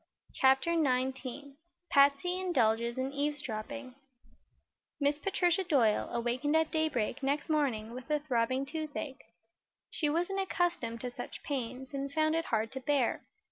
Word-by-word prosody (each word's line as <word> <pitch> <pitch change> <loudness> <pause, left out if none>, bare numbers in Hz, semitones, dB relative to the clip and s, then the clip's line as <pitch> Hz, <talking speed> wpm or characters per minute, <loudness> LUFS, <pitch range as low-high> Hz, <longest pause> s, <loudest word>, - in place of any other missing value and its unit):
CHAPTER 265 +5 +4
XIX 265 -2 0 0.4
PATSY 280 +6 +4
INDULGES 235 -9 +1
IN 260 +1 -1
EAVESDROPPING 280 -2 -3 1.1
Miss 290 0 +2
Patricia 360 +1 +1
Doyle 255 - +2
awakened 245 +6 0
at 320 0 +3
daybreak 290 -6 0
next 280 +3 -1
morning 245 -8 0
with 255 +3 -8
a 300 - +3
throbbing 260 -2 0
toothache. 290 -2 -5 0.7
She 300 - 0
wasn't 355 +5 0
accustomed 345 -11 -1
to 250 - -3
such - - -8
pains 260 -1 -4
and 275 0 -3
found 310 +1 +2
it 330 0 0
hard 220 0 0
to 265 - -4
bear. 265 -2 +1
280 Hz, 135 wpm, -32 LUFS, 250-310 Hz, 1.1 s, CHAPTER